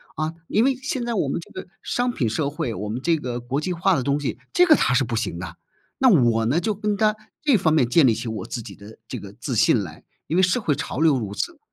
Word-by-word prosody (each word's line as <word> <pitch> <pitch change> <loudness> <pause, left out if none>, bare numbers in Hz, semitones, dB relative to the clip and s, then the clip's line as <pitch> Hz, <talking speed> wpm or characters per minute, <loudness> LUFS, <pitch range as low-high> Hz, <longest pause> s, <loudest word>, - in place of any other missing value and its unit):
啊， 155 +1 -2
因 215 - +2
为 270 0 +2
现 260 -1 -3
在 240 - -2
我 170 - 0
们 140 - -2
这 - - -15
个 185 - -8 0.2
商 245 +1 0
品 120 - -1
社 140 +6 -1
会， 130 -5 -3
我 105 +2 -5
们 120 +4 -4
这 165 +3 +2
个 125 -4 -4
国 130 +4 -2
际 180 +3 -2
化 180 +2 +2
的 130 - -1
东 140 +2 +1
西， 145 - -3
这 360 - +5
个 320 -3 +7
他 - - +2
是 - - +3
不 - - -3
行 - - -3
的 - - -4
啊。 - - -11 0.5
那 260 - +8
我 120 - +4
呢， 135 +9 +2
就 210 +5 -1
跟 210 0 -2
他 215 0 +2 0.3
这 290 -4 +4
方 165 -4 +2
面 130 -6 +3
建 135 +3 +5
立 115 - +3
起 115 +2 -5
我 110 -4 -4
自 120 - -4
己 100 -2 -10
的 105 +3 -13
这 125 - -5
个 100 -2 -10
自 125 +4 -5
信 110 -1 +3
来， 80 -5 -10 0.2
因 160 - -2
为 - - +5
社 185 +7 +3
会 160 -10 0
潮 140 -1 -4
流 160 -3 +4
如 105 -4 -5
此。 335 -4 -3
145 Hz, 305 characters per minute, -23 LUFS, 120-195 Hz, 0.5 s, 那